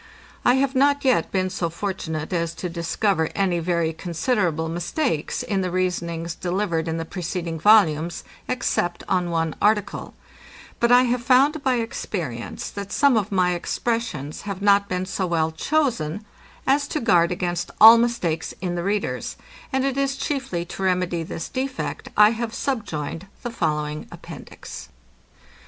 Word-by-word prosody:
I 245 - +5
have 270 0 +1
not 285 +1 +3
yet 250 -11 +2
been 185 -1 0
so 175 -2 -1
fortunate 165 -3 -4
as 170 -1 -1
to 180 - -4
discover 170 0 0
any 185 -3 +1
very 170 -1 0
considerable 170 -1 -1
mistakes 175 - -2
in 195 -2 -1
the 185 - -1
reasonings 170 -2 -2
delivered 175 -2 -1
in 165 0 -1
the 165 - -3
preceding 170 -1 -4
volumes, 170 -4 +4 0.2
except 175 -8 -1
on 180 -2 +1
one 165 -1 0
article: 210 -1 +1 0.6
But 235 0 +3
I 250 +1 +7
have 245 -1 0
found 275 +5 +4
by 260 -1 +2
experience, 175 - -4
that 200 -1 -6
some 280 -4 +4
of 210 -3 0
my 180 -2 +2
expressions 175 - -2
have 195 -2 -4
not 200 0 +4
been 185 0 -1
so 185 0 -2
well 160 -2 +1
chosen, 210 - -1 0.4
as 280 +1 +2
to 305 - -2
guard 175 - +3
against 175 -1 -2
all 225 +2 +10
mistakes 230 -9 -1
in 180 -2 -2
the 175 - -2
readers; 200 +3 -2 0.3
and 265 0 +1
it 275 -1 -1
is 275 0 0
chiefly 260 - -2
to 175 - -8
remedy 180 -2 +1
this 165 0 -5
defect, 260 +1 -4
I 210 +1 +8
have 230 0 -3
subjoined 190 - -3 0.2
the 240 - -3
following 150 -6 -2
appendix. - - -10
185 Hz, 155 wpm, -23 LUFS, 170-235 Hz, 0.6 s, all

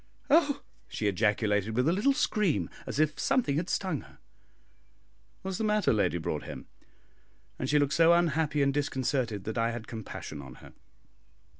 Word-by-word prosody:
"Oh!" 290 -2 +4 0.2
she 110 - -4
ejaculated, 105 +1 +1
with 125 +4 +2
a 165 - +4
little 210 +9 +3
scream, 170 - 0 0.2
as - - -3
if 155 -1 +1
something 250 - +1
had 175 +3 -2
stung 185 -7 -1
her. - - -18 1.3
"What 190 - -3
is 185 - -3
the - - -1
matter, 210 - +2
Lady 100 -5 +1
Broadhem?" 80 - -5 0.9
and 130 - -2
she 150 - +4
looked 145 0 +2
so 165 0 +5
unhappy 160 -3 +2
and 140 0 +2
disconcerted 130 -6 -1
that 110 +3 -3
I 115 0 +2
had 115 -1 -5
compassion 105 -9 -7
on 65 -2 -11
her. - - -15
140 Hz, 165 wpm, -29 LUFS, 110-175 Hz, 1.3 s, so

